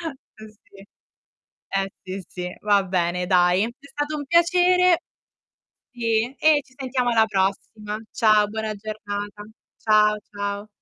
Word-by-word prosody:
eh 220 -4 -16
si. 200 -1 -19 0.9
Eh, 195 0 -1
sì, 185 0 -6
sì, 180 0 -6
va 205 -2 +3
bene 180 -1 -1
dai. 180 +1 +3
È 240 +4 -9
stato 290 +1 -3
un 290 - -5
piacere 355 +2 +4 1.0
e 230 +1 0
e 310 -1 +4
ci 260 - -25
sentiamo 255 -2 -1
alla 225 -2 +4
prossima. 210 +1 -2
Ciao 215 -2 +4
buona 220 0 -3
giornata. 205 -1 -6 0.4
Ciao 210 -1 +4
ciao. 205 0 -4
215 Hz, 130 wpm, -23 LUFS, 200-245 Hz, 1.0 s, piacere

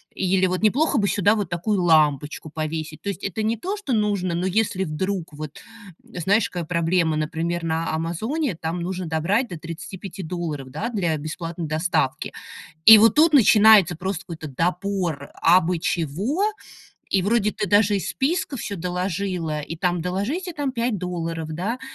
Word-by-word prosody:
или 190 0 +2
вот 185 0 -2
неплохо 275 +8 +3
бы 205 -3 +2
сюда 200 +1 +3
вот 205 -5 -2
такую 180 +3 -1
лампочку 155 -2 +2
повесить. 155 0 -4
То 200 - -4
есть 200 - -5
это 200 +2 -3
не 220 +2 0
то, 375 - -3
что 340 -12 -3
нужно, 200 -5 0
но 175 +2 -1
если 190 0 0
вдруг 180 +1 -3
вот, 150 0 -8 0.4
знаешь, 195 +5 0
какая 175 -2 -4
проблема. 170 -1 +1
Например, 165 +2 -2
на 165 0 -1
"Амазоне", 215 - -2
там 165 +2 -4
нужно 185 0 -3
добрать 175 +10 0
до 175 - -7
35 180 +4 -8
долларов, 155 -5 -4
да, 155 - -4
для 175 -9 -1
бесплатной 165 +2 -5
доставки. 155 -3 -1 0.6
И 220 -1 +12
вот 225 0 +5
тут 315 +2 +5
начинается 210 - +6
просто 190 +1 -3
какой-то 160 -3 -7
добор 175 -1 -2
абы 175 0 +4
чего. 180 - -1 0.7
И 195 - +2
вроде 210 +2 +1
ты 205 -3 -3
даже 205 +1 +4
из 195 - -2
списка 285 0 -1
всё 205 -3 -4
доложила, 180 -3 -2
и 165 +3 -7
там 175 0 0
"доложите 205 - -2
там 285 -4 -3
5 235 -2 -1
долларов", 165 -3 -4
да. 205 +10 -3
180 Hz, 165 wpm, -23 LUFS, 165-205 Hz, 0.7 s, И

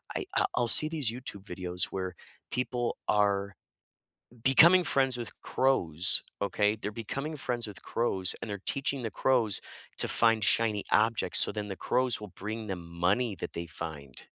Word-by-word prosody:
I - - -5
I'll - - 0
I'll 120 -1 -2
see 155 +6 +10
these 150 -8 0
YouTube 115 -5 -7
videos 90 -1 -2
where 95 -1 -8 0.4
people 125 -1 -5
are 100 -1 -2 0.9
becoming 170 +7 +4
friends 135 -5 0
with 120 - -6
crows, 90 - 0 0.2
okay? 105 +1 -2
They're 105 -1 -8
becoming 135 +8 -8
friends 120 -4 -2
with 100 - -12
crows, 95 -6 +2
and 115 - -8
they're 100 -1 -7
teaching 140 -2 -2
the 110 - -6
crows 120 -7 +4 0.4
to - - +4
find 115 -2 +2
shiny 105 -1 +1
objects, 110 +1 +3
so - - +8
then 105 0 -7
the 95 - -7
crows 125 -2 +2
will 105 - -11
bring 110 +2 -8
them 95 -3 -8
money 100 +6 -2
that - - -9
they 85 0 -8
find. 70 -5 -10
110 Hz, 165 wpm, -26 LUFS, 95-125 Hz, 0.9 s, see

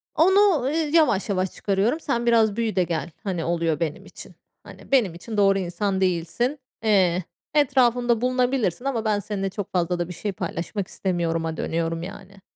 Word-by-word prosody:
onu, 380 0 +5
ııı, 270 - 0
yavaş 310 - +2
yavaş 185 -2 0
çıkarıyorum. 205 +9 0
Sen 240 -6 -1
biraz 225 -3 +4
büyü 225 -1 -1
de 185 - +3
gel. 165 -3 -3
Hani, 185 -5 -2
oluyor 165 -3 0
benim 160 -3 -3
için. - - -12 0.3
Hani, - - -14
benim 235 -10 +3
için 210 +6 -7
doğru 195 -1 +4
insan 190 +2 -2
değilsin. 190 - 0 0.2
Eee, 185 -4 +3 0.3
etrafımda 245 -5 +3
bulunabilirsin 250 -3 0
ama 235 -5 -1
ben 210 -1 +2
seninle 200 -2 -3
çok 200 0 -6
fazla 175 -1 0
da 175 - -1
bir 180 - -5
şey 205 +4 -3
paylaşmak 180 +2 -4
istemiyoruma, 165 -3 -2
dönüyorum, 165 0 -2
yani. 195 +1 -10
200 Hz, 165 wpm, -24 LUFS, 175-240 Hz, 0.3 s, onu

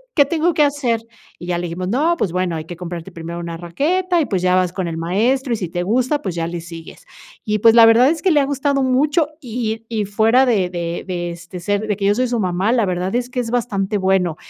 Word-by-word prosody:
¿qué 285 - +5
tengo 330 +3 +1
que 300 - +4
hacer?" 275 -6 0 0.4
Y 175 - -9
ya 175 -1 0
le 175 - -3
dijimos: 180 +2 -4
"No, 295 - +1
pues 190 - -1
bueno, 180 -1 -1
hay 155 -1 -5
que 175 - -8
comprarte 175 +1 -7
primero 170 0 -7
una 170 -1 -5
raqueta 335 - 0
y, 315 - +1
pues, 190 -7 -1
ya 180 0 +3
vas 185 -1 +1
con 185 -2 -3
el 165 -1 -4
maestro 235 +10 0
y, - - +2
si 180 -5 -4
te 175 +1 -3
gusta, 255 +9 +1
pues 185 - -3
ya 165 -1 -2
le 170 0 -5
sigues." 165 - -11 0.4
Y, 215 0 0
pues, 225 +2 +6
la 230 -1 +9
verdad 230 +4 +6
es 320 0 -1
que 375 - +3
le 300 - +4
ha 280 - +2
gustado 280 0 0
mucho 290 +5 +2
y 225 -4 -4
y 220 -3 -1
fuera 225 +6 +3
de 200 -7 +2
de 170 -1 -4
de, 175 -2 -3
este, 170 +1 -9
ser 205 +4 -1
de 210 - 0
que 200 0 -3
yo 205 +1 +3
soy 255 +2 +1
su 240 -1 -1
mamá, 185 +2 0
la 235 -4 +2
verdad 180 +1 -2
es 245 0 -1
que 250 - -3
es 230 -2 -3
bastante 210 -5 -1
bueno. 190 -3 +1
205 Hz, 260 wpm, -19 LUFS, 175-255 Hz, 0.4 s, la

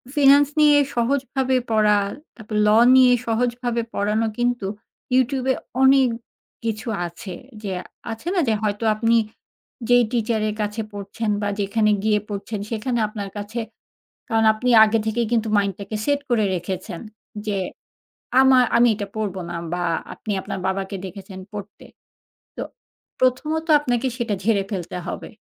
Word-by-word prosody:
Finance 285 0 +6
নিয়ে 295 -1 +6 0.2
সহজভাবে 260 +1 +1
পড়া, 210 -1 +4 0.4
তারপর 215 -2 -5
law 220 +2 +6
নিয়ে 255 -1 +7 0.2
সহজভাবে 240 +1 0
পড়ানো 210 +2 +1
কিন্তু 240 -4 0 0.5
ইউটিউব 260 0 +2
এ - - -3 0.3
অনেক 265 -1 +6 0.5
কিছু 225 0 -3 0.2
আছে। 180 +3 -9 0.3
যে 200 - -3 0.4
আছে 225 +8 -8
না, - - +3
যে 225 - +3
হয়তো 210 +1 -1
আপনি 230 +2 +2 0.7
যেই 245 -1 +5
টিচার 230 -1 0
এর 210 - -2
কাছে 210 +2 -3
পড়ছেন, 205 +2 -4
বা 205 - 0
যেখানে 215 +2 +1
গিয়ে 210 -1 +3
পড়ছেন, 205 +1 -5
সেখানে 235 +2 -1
আপনার 205 -2 -6
কাছে, 210 +3 -4 0.7
কারণ 225 -1 +2
আপনি 250 +4 -2
আগে 220 +1 +3
থেকেই 225 +1 0
কিন্তু 225 -1 +1
মাইন্ডটাকে 200 +1 -2
সেট 285 -1 +1
করে 225 -3 +2
রেখেছেন, 180 0 -5 0.5
যে 205 -2 0 0.8
আমার, 260 -1 +6
আমি 240 +1 +6
এটা 205 -1 -5
পড়ব 210 -3 -2
না, - - -5 0.2
বা 180 - -1 0.3
আপনি 215 - -6
আপনার - - -5
বাবাকে 195 +1 -2
দেখেছেন 190 +1 -9
পড়তে। 205 -1 -9 0.7
তো - - -4 0.6
প্রথমত 300 +6 +1
আপনাকে 245 -2 -1
সেটা 235 -4 -1
ঝেড়ে 205 -2 +2
ফেলতে 180 -5 -4
হবে। - - -6
225 Hz, 145 wpm, -22 LUFS, 205-245 Hz, 0.8 s, নিয়ে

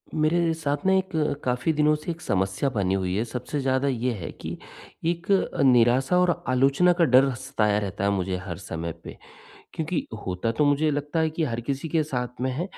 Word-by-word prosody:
मेरे 165 +2 +2
साथ 145 -3 -1
में 190 0 +4
एक 190 0 -1 0.3
काफ़ी 125 +5 0
दिनों 150 0 +3
से 150 +3 -7
एक 165 - -8
समस्या 95 - 0
बनी 95 -2 +1
हुई 95 -1 -1
है, 110 - +1
सबसे 125 +5 -4
ज़्यादा 130 +1 +1
ये 125 -1 0
है 95 -7 -6
कि - - -5 0.5
एक 170 +2 -1
अ, 195 - +1
निराशा 130 +4 +4
और 175 -1 +1
आलोचना 135 +7 +4
का 175 0 +2
डर 130 0 +5
सताया 115 -5 0
रहता 100 -1 -4
है 100 - +3
मुझे 95 -1 -1
हर 85 -4 -5
समय 85 -2 -5
पे। - - -9 0.6
क्योंकि 160 +1 -2 0.2
होता 95 +4 -1
तो 145 +6 +1
मुझे 145 +2 +2
लगता 145 +3 -2
है 160 0 +2
कि 160 +1 -2
हर 120 -6 -2
किसी 135 +5 -3
के 160 +1 +2
साथ 125 -4 -4
में 130 +1 0
है 140 +7 -2
135 Hz, 205 wpm, -25 LUFS, 115-155 Hz, 0.6 s, डर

